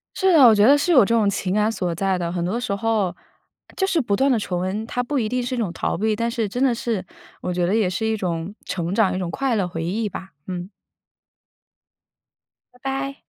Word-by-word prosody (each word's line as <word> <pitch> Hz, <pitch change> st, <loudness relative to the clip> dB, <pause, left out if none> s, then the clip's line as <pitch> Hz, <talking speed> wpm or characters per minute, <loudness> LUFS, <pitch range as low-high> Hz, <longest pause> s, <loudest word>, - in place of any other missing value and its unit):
是 380 Hz, -1 st, +3 dB
的， 310 Hz, -5 st, +7 dB
我 225 Hz, -, +7 dB
觉 205 Hz, 0 st, +5 dB
得 280 Hz, +3 st, +7 dB
是 290 Hz, +5 st, 0 dB
有 255 Hz, -9 st, +7 dB
这 230 Hz, -, +1 dB
种 220 Hz, -3 st, +3 dB
情 195 Hz, -1 st, -1 dB
感 210 Hz, +1 st, +2 dB
所 180 Hz, -6 st, -2 dB
在 190 Hz, +2 st, 0 dB
的， 170 Hz, -1 st, -2 dB
很 175 Hz, -1 st, -2 dB
多 190 Hz, +7 st, -1 dB
时 245 Hz, -5 st, -2 dB
候， 205 Hz, -4 st, 0 dB, 0.6 s
就 385 Hz, -, +1 dB
是 355 Hz, -4 st, +1 dB
不 205 Hz, -7 st, 0 dB
断 270 Hz, +4 st, +2 dB
地 245 Hz, -, +3 dB
重 180 Hz, -4 st, -2 dB
温， 200 Hz, +4 st, -2 dB
它 245 Hz, -, -2 dB
不 280 Hz, +3 st, -2 dB
一 220 Hz, -4 st, 0 dB
定 250 Hz, +2 st, -1 dB
是 245 Hz, +1 st, -3 dB
一 -, -, -3 dB
种 205 Hz, -7 st, -1 dB
逃 -, -, -2 dB
避， 215 Hz, +1 st, 0 dB
但 230 Hz, +2 st, -1 dB
是 230 Hz, -3 st, -1 dB
真 245 Hz, +6 st, -3 dB
的 255 Hz, -3 st, +3 dB
是 225 Hz, -5 st, -2 dB, 0.4 s
我 180 Hz, -, -3 dB
觉 175 Hz, 0 st, 0 dB
得 190 Hz, -, +1 dB
也 220 Hz, -4 st, +2 dB
是 190 Hz, +5 st, -2 dB
一 220 Hz, 0 st, +1 dB
种 175 Hz, -1 st, -3 dB
成 175 Hz, 0 st, -3 dB
长， 210 Hz, -2 st, +3 dB
一 -, -, -2 dB
种 180 Hz, -2 st, -3 dB
快 265 Hz, +7 st, 0 dB
乐 200 Hz, -4 st, +1 dB
回 165 Hz, -1 st, -4 dB
忆 210 Hz, +5 st, -1 dB
吧， 190 Hz, 0 st, -8 dB, 0.2 s
嗯。 180 Hz, 0 st, -5 dB, 2.0 s
拜 -, -, -21 dB
拜。 270 Hz, +1 st, -3 dB
215 Hz, 260 characters per minute, -22 LUFS, 185-245 Hz, 2.0 s, 的